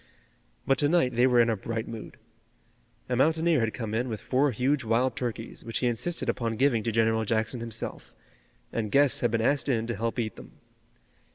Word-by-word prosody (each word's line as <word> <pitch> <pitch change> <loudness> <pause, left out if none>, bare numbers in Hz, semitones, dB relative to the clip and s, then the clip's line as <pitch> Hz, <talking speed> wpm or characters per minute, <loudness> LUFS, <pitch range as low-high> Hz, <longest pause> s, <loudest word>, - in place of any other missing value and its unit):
But 135 - +2
to 145 - +2
night 155 -7 +2
they 120 +2 +4
were 125 -2 +4
in 115 - +3
a - - +1
bright 110 +3 -4
mood. 115 -1 -8 0.9
A 125 - -1
mountaineer 160 +4 +3
had 115 -1 0
come 110 -3 -4
in 120 +3 -1
with 110 -2 -4
four 135 +3 +1
huge 130 +4 0
wild 115 +2 +1
turkeys, 120 -2 -5
which 115 -3 -3
he 125 - -1
insisted 125 +8 -1
upon 115 -2 -1
giving 130 -2 +2
to 115 - -2
General 110 0 +2
Jackson 110 +3 -1
himself, 115 -1 -6 0.6
and 110 -3 -2
guests 140 -1 +4
had 120 - +1
been 115 0 0
asked 140 +5 +1
in 115 -4 +1
to 115 -1 -3
help 115 +4 -2
eat 110 -3 -3
them. - - -12
120 Hz, 200 wpm, -27 LUFS, 115-130 Hz, 0.9 s, they